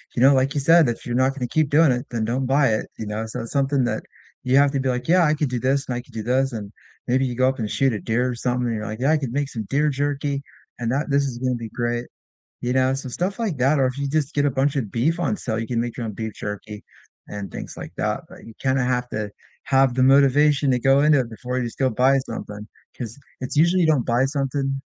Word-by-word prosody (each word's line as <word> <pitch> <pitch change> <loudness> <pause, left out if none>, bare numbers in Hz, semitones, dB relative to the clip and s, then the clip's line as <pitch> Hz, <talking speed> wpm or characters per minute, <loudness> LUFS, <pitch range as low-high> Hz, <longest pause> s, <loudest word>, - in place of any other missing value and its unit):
you 120 - 0
know, 135 +2 +7
like 135 +1 +2
you 145 - -1
said, 165 +1 +6
"If 115 - -5
you're 120 0 -2
not 130 +1 +2
gonna 125 -3 -3
keep 155 +2 +1
doing 150 0 +5
it, 125 0 -2
then 115 -2 -1
don't 125 +4 -1
buy 135 +1 +3
it," 110 - -2
you 110 - -5
know? 105 +1 -3
So 110 - -5
it's 115 - -7
something 140 -1 +1
that 120 - -2 0.4
you 130 +1 +2
have 140 0 +5
to 140 - -1
be, 130 - -1
like, 125 0 -2
"Yeah, 180 +1 +5
I 150 - +3
could 150 -2 -1
do 125 -1 -2
this, 135 +3 +1
and 125 - -2
I 120 - -3
could 125 -1 -21
do 110 - -4
this," 130 +3 +1
and 105 -3 -6 0.4
maybe 130 +2 +2
you 125 -2 -3
go 130 +1 +3
up 135 0 -4
and 110 -2 -2
shoot 135 -1 +2
a 105 - -3
deer 120 +5 0
or 125 - -3
something, 125 +1 -1
and 115 - -1
you're, 105 0 -4
like, 110 +1 -5
"Yeah, 140 +4 +3
I 160 - +4
could 135 -5 -4
make 140 0 -1
some 115 -5 -5
deer 150 +2 +2
jerky, 140 0 -2 0.4
and 120 -1 -2
that 150 +3 -1
this 140 0 +3
is 130 -3 -4
gonna 130 0 0
be 115 -2 -6
great." 120 +1 -2 0.6
You 125 +1 -1
know? 130 0 +3
So 135 0 -6
stuff 180 - -3
like 210 -10 -1
that, 140 +4 +3
or 135 - +4
if 130 +1 -5
you 140 0 -2
just 150 0 -1
get 145 0 +1
a 145 - +2
bunch 135 +2 +1
of 115 -8 -2
beef 155 +9 0
on 205 - 0
sale, 110 -9 -3
you 115 - -4
can 120 -2 -1
make 120 -1 -4
your 120 - -3
own 105 - -5
beef 110 0 -5
jerky 105 +1 -7 0.5
and 105 -1 -6
things - - -7
like - - -7
that, - - -1
but - - -14
you 115 - -11
kinda 135 -1 +1
have 125 0 0
to 105 -2 -4 0.3
have 135 -2 +3
the 130 +1 +2
motivation 140 +1 +4
to 125 - +2
go 135 +2 +4
into 150 -1 +5
it 125 -3 -2
before 125 +3 -5
you - - -1
just 115 - -7
go 130 -1 +2
buy 130 +4 +3
something, 105 -4 -7 0.3
'cause 115 -1 -6 0.2
it's 130 +2 -5
usually 170 +4 +4
you - - +3
don't 150 -6 +2
buy 120 +2 +3
something 135 -1 -2
130 Hz, 285 wpm, -23 LUFS, 120-140 Hz, 0.6 s, know